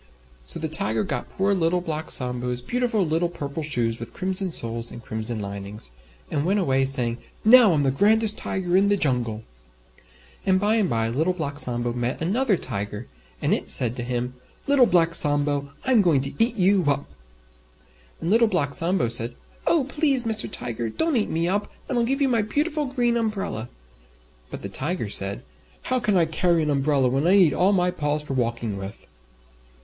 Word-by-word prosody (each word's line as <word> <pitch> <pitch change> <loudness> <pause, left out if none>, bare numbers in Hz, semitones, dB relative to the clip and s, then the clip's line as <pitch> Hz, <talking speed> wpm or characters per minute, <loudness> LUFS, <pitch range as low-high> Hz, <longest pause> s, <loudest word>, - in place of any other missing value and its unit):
So 60 - 0
the 160 - -2
Tiger 115 -8 0
got 120 - -4
poor 195 +1 0
Little 180 -1 +1
Black 160 -3 -4
Sambo's 125 -1 0
beautiful 240 - 0
little 165 +2 0
Purple 145 -2 -6
Shoes 120 -6 -2
with 115 0 -9
Crimson 185 0 0
Soles 115 -4 0
and 120 - -11
Crimson 110 +1 -2
Linings, 100 - -4 0.4
and 145 -2 0
went 195 +5 +1
away 135 -7 +1
saying, 125 -3 -1 0.3
"Now 230 -2 +8
I'm 145 -2 +1
the 135 - +2
grandest 215 +8 +3
Tiger 180 -2 -2
in 200 +2 +4
the 205 - +2
Jungle." 120 - -1 1.0
And 185 -1 +2
by 210 +3 +2
and 205 -5 +1
by 115 -1 0
Little 160 +10 0
Black 145 -5 -5
Sambo 120 -3 -2
met 120 +1 -3
another 205 +5 +1
Tiger, 105 0 -5 0.4
and - - +2
it - - -2
said 120 -1 +4
to 120 - -5
him, 125 +1 -3 0.3
"Little 280 -3 +4
Black 170 -2 +2
Sambo, 145 -3 +2
I'm 255 -4 +4
going 165 -8 +2
to 135 +1 -5
eat 235 +1 0
you 195 -1 +3
up!" 140 0 +1 1.1
And 170 - -2
Little 230 +1 +5
Black 145 -9 0
Sambo 170 -3 +1
said, 115 +1 0 0.3
"Oh! 330 -4 +3
Please, 275 -2 +1
Mr. 220 -2 +1
Tiger, 115 - -4
don't 320 - 0
eat 220 - +1
me 165 +1 0
up 205 +3 -1 0.2
and 265 - -3
I'll 240 - +2
give 270 +4 -1
you - - +3
my 235 -4 +2
beautiful 295 +8 -1
Green 245 -3 0
Umbrella." 200 - -3 0.8
But - - -8
the - - -3
Tiger 130 - -3
said, 100 +4 +2 0.4
"How 255 0 0
can 210 -4 +1
I 170 - +4
carry 170 +1 +1
an 150 - 0
umbrella 140 -1 +2
when 135 +6 0
I 190 - +5
need 180 -7 +5
all 185 +3 +3
my 180 -2 +2
paws 150 -3 -1
for 145 - -5
walking 115 -4 -2
with?" 95 +2 -8
160 Hz, 190 wpm, -23 LUFS, 125-200 Hz, 1.1 s, Now